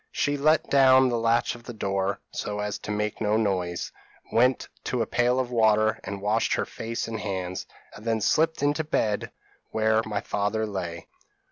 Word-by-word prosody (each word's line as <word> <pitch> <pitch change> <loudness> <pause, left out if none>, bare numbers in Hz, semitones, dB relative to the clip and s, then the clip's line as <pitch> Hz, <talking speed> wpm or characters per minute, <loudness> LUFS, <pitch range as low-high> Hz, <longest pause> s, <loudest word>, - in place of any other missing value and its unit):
She 145 - 0
let 155 +2 +3
down 130 -1 +6
the 120 -1 0
latch 115 +1 +2
of 120 - -11
the 120 0 -9
door, 100 -1 -1
so 105 0 -4
as 105 0 -3
to - - -9
make 105 +1 -2
no 105 0 +2
noise, 90 -5 -1 0.4
went 125 +3 +3 0.2
to 125 -2 0
a - - -3
pail 120 +3 +1
of 125 -1 -2
water, 110 -1 +3
and 100 0 -6
washed 110 +2 +1
her - - -1
face 115 +1 -4
and 110 -1 -4
hands, 95 -3 -4 0.3
and 105 - -12
then 115 -1 0
slipped 160 +7 +2
into 145 +2 +2
the 155 - -10
bed 105 -7 0 0.4
where 110 0 +2
my 105 -2 -2
father 105 +2 -1
lay. 90 -5 -5
110 Hz, 190 wpm, -26 LUFS, 105-120 Hz, 0.4 s, down